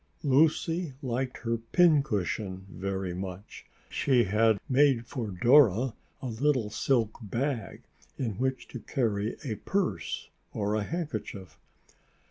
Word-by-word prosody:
Lucy 160 +3 +2
liked 130 +1 -2
her 115 0 -1
pincushion 110 - +1
very 95 0 -3
much. 95 +2 -7 0.2
She 125 -3 +2
had 110 +1 +3
made 135 -3 +3
for 120 -2 -4
Dora 120 +3 +4 0.3
a - - -3
little 125 -2 0
silk 115 -1 0
bag 120 +4 -3 0.3
in 110 -7 -3
which 130 0 -1
to 125 - -7
carry 110 -2 -1
a 115 -7 -3
purse 195 -2 -2 0.2
or 105 0 -1
a 110 - +1
handkerchief. 140 - -5
115 Hz, 115 wpm, -29 LUFS, 105-135 Hz, 0.3 s, Dora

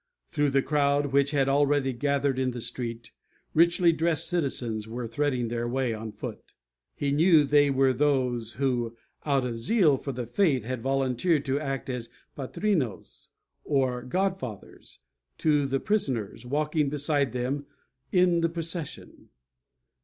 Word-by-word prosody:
Through 145 -3 +1
the 135 0 +2
crowd, 145 -1 +1
which 140 0 +3
had 140 -2 +1
already 140 -1 +2
gathered 140 +1 0
in 130 -1 +1
the 125 -1 -5
street, 115 -1 -5 0.4
richly 170 +1 +4
dressed 165 -1 +1
citizens 120 -10 -1
were 120 +1 -5
threading 125 0 -1
their 120 +1 -2
way 125 -1 -1
on 110 0 -6
foot. - - -9 0.4
He 140 -1 -1
knew 160 +1 +5
they 145 0 +4
were 135 -1 +3
those 125 -4 0
who, 120 -4 -1 0.3
out 135 -3 +2
of 115 -2 -4
zeal 155 - +3
for 140 - -5
the 125 -2 -4
faith, 135 - +1
had 125 +1 -4
volunteered 135 +4 +1
to 135 +1 0
act 135 -3 -4
as 125 -3 -4 0.3
patrinos, 140 - -2 0.3
or 130 -4 0
god 190 +9 -1
fathers, 110 - -9 0.4
to 150 -3 +2
the 135 0 0
prisoners, 130 - -1
walking 150 +2 0
beside 145 -2 0
them 130 +4 -3 0.4
in 180 -2 +3
the 165 - +2
procession. 165 -1 -6
135 Hz, 145 wpm, -27 LUFS, 125-150 Hz, 0.4 s, knew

